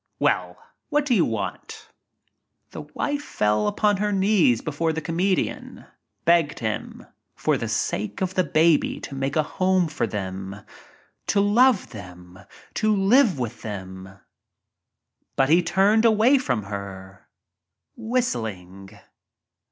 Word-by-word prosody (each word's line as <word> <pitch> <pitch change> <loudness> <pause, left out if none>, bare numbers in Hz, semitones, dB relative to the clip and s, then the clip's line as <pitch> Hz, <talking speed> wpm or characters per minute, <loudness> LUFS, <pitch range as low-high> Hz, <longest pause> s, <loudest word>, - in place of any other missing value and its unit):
Well, - - 0 0.3
what 295 -1 +1
do 270 - +1
you - - +4
want?" - - -5
)J - - -28 0.8
The - - -7
wife 290 0 -3
fell 105 - 0
upon 205 - +1
her 210 +1 -1
knees 190 - +3
before 160 +2 -1
the 160 - -2
come 165 +1 -5
dian, 185 0 -1 0.4
begged 170 -3 +3
him 110 -2 -4 0.3
for - - +1
the - - -3
sake 105 +2 -2
of 185 -1 -2
the 185 - +2
baby 160 0 +2
to - - -8
make 135 +1 -3
a 155 - +3
home 185 +2 +1
for 155 - -2
them 95 -1 -5 0.4
— - - -34
to 200 - +2
love 215 +3 +3
them 90 -4 -11 0.2
— - - -23
to 215 -1 +3
live 200 - +4
with 120 -2 -5
them. 95 -2 -8 1.2
But 135 0 +2
he 170 +3 +5
turned 195 +6 +3
away 230 +4 +4
from 125 - -1
her 100 -1 -8 0.3
— - - -59
whistling. 110 - -3
160 Hz, 145 wpm, -24 LUFS, -, 1.2 s, he